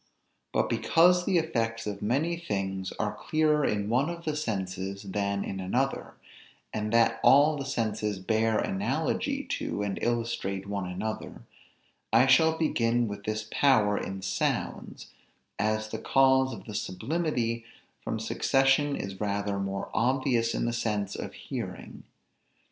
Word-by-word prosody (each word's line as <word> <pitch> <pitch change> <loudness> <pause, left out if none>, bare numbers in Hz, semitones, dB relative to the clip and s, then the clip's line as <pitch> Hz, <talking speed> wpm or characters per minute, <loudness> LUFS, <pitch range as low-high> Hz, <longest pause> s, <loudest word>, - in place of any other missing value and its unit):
But - - +1
because 180 +2 +4
the 190 -3 +2
effects 115 -8 -1
of 105 -1 -4
many 140 +11 +1
things 95 - -3
are - - -2
clearer 155 -1 +1
in 105 -5 0
one 130 +7 +2
of 170 0 -7
the 155 -1 -1
senses 100 -7 -3
than 100 0 -1
in 95 - -5
another, 125 +9 -1 0.6
and 105 0 -2
that 115 0 +3
all 145 +3 +6
the 140 -2 -4
senses 110 -5 -1
bear 110 +3 +1
analogy 95 +1 -1 0.2
to 105 - -2
and 100 -1 -3
illustrate 115 -5 -1
one 100 -2 -3
another, 100 +5 -5 0.7
I 115 +3 +6
shall 160 +4 +5
begin 120 -6 +1
with 100 -1 -7
this 110 0 -3
power 110 -8 +4
in 95 -1 -4
sounds, 95 - -2 0.5
as 110 +1 0
the 110 - -4
cause 130 +1 +4
of - - -8
the 105 - -8
sublimity 115 - -2 0.4
from - - -3
succession 135 +2 +2
is 95 0 -6
rather 100 -1 -1
more 100 0 -3
obvious 120 -1 +1
in - - 0
the 120 - -1
sense 105 -3 -1
of - - -6
hearing. - - -7
115 Hz, 145 wpm, -28 LUFS, 100-135 Hz, 0.7 s, all